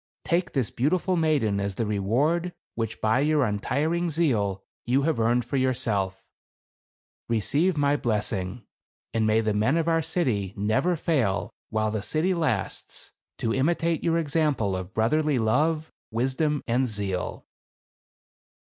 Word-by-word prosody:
Take 175 0 0
this 130 -7 0
beautiful 175 +8 +1
mai 160 -2 +3
den 105 -6 0
as 100 -1 -2
the 115 - -1
reward 135 - 0 0.2
which 115 -1 -3
by 110 +3 +3
your 150 -1 +3
untiring 150 +11 0
zeal 110 - 0 0.2
you 130 +3 +2
have 155 -4 +1
earned 120 +1 +2
for 135 +3 -2
yourself. 105 -7 0 1.0
Receive 145 - +2
my 145 0 +3
blessing; 105 -3 -2 0.5
and 110 -1 +1
may 110 +1 +3
the 110 -1 0
men 110 +9 +2
of 165 0 0
our 165 -1 +3
city 110 - -1
never 110 - +1
fail, 130 - 0 0.2
while 110 -1 0
the 110 -1 -2
city 160 - 0
lasts, 140 - -3 0.3
to 115 - -1
imitate 165 +4 +1
your 165 -1 +2
example 145 - +1
of 95 0 -5
brotherly 145 +6 +2
love, 155 +8 +1 0.2
wisdom 135 +6 0
and 125 +2 +2
zeal." 100 -4 -3
125 Hz, 140 wpm, -26 LUFS, 110-155 Hz, 1.0 s, mai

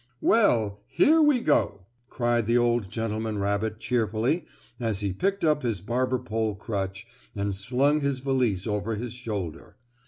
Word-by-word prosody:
"Well, 110 - +3
here 310 - +4
we 295 -5 +4
go!" 100 - +1 0.2
cried 120 -2 0
the 120 +1 +3
old 120 -4 +1
gentleman 110 0 -3
rabbit 100 +2 -1
cheerfully 120 +7 0 0.3
as 110 -4 -1
he 100 -2 -1
picked 195 - -1
up 150 -2 +3
his 115 -6 -1
barber 125 +6 0
pole 110 -4 -2
crutch 95 -1 -4 0.3
and 100 -1 -2
slung 130 +9 +2
his 140 -1 0
valise 125 -8 0
over 105 0 -1
his 120 +2 -5
shoulder. 105 -10 -6
115 Hz, 150 wpm, -26 LUFS, 105-130 Hz, 0.3 s, here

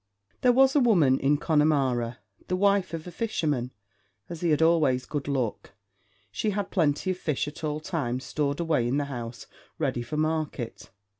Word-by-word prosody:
There 250 - +5
was 265 +2 +4
a - - +6
woman 170 - +4
in 145 +2 +2
Connemara, 135 -7 +1 0.3
the 185 - 0
wife 200 -2 +2
of 160 - -7
a 180 - -7
fisherman; 150 - -1 0.6
as 170 -2 -7
he 175 - +1
had 150 - +3
always 150 -6 +3
good 145 -2 -4
luck, 130 -8 -2 0.6
she 215 - -1
had 205 -1 -2
plenty 165 0 +1
of 185 - -5
fish 150 -5 -1
at 150 +2 -9
all 150 0 -1
times 140 -7 -3
stored 145 -1 -2
away 155 -8 +1
in 130 +3 0
the 145 - 0
house 120 -3 -7 0.3
ready 135 -6 -1
for 120 +6 -5
market. 155 -6 -2
150 Hz, 175 wpm, -27 LUFS, 130-170 Hz, 0.6 s, a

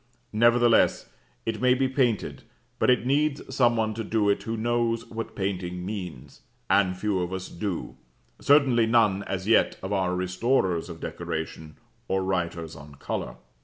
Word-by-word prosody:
Nevertheless 120 +1 +4 0.4
it 115 -1 -3
may 125 0 +4
be 135 +1 +1
painted, 130 -5 0 0.4
but - - +3
it 125 -2 +3
needs 140 0 0
some 120 -3 +4
one 110 -1 0
to 115 +1 -4
do 105 -1 +1
it - - -1
who 115 0 -4
knows 115 0 0
what 115 0 -6
painting 90 -2 -3
means, 90 -10 -7 0.3
and 95 -2 +3
few 100 0 0
of 90 0 -3
us 95 0 -5
do 90 0 -4 0.4
certainly 130 -6 +4
none, 110 -4 +3
as 95 0 -4
yet, 115 - +3
of 95 +2 -3
our 90 -2 0
restorers 90 -1 0
of 85 -1 -8
decoration 80 -1 -5 0.3
or 95 0 0
writers 85 -3 -2
on 70 0 -12
colour. - - -4
105 Hz, 160 wpm, -26 LUFS, 90-120 Hz, 0.4 s, Nevertheless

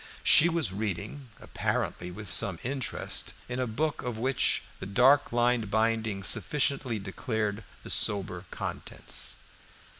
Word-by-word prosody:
She 170 - +7
was 160 - 0
reading, 110 +6 -5
apparently 90 - -3
with 105 +4 -9
some 85 +2 +2
interest, 130 0 -2
in 125 +1 -4
a 130 - 0
book 150 +7 -2
of 120 -3 -4
which 130 +3 +1 0.2
the 95 - -6
dark 130 +7 +4
lined 120 -2 +1
binding 110 -2 0
sufficiently 130 - +2
declared 105 +1 -3 0.2
the - - -3
sober 95 -3 +2
contents. - - -5
110 Hz, 125 wpm, -28 LUFS, 100-130 Hz, 0.2 s, She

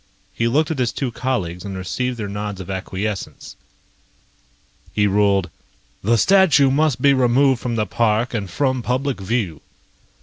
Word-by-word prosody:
He 115 - 0
looked 150 +7 +1
at 155 - -3
his 125 -3 +1
two 135 -4 -3
colleagues 95 -10 -3
and 100 -2 -6
received 125 +7 -3
their 110 -3 -4
nods 105 -1 -5
of 95 +1 -6
acquiescence. 95 +2 -5 1.4
He 105 - +3
ruled: 100 -3 +2 0.5
"The 115 +4 +3
statue 160 - +5
must 140 -3 +1
be 140 -1 +6
removed 130 0 +3
from 120 -2 -2
the 110 -2 0
park 110 +4 0
and 100 -5 -3
from 130 +5 0
public 130 +2 -1
view." 95 -6 -2
115 Hz, 155 wpm, -20 LUFS, 100-130 Hz, 1.4 s, be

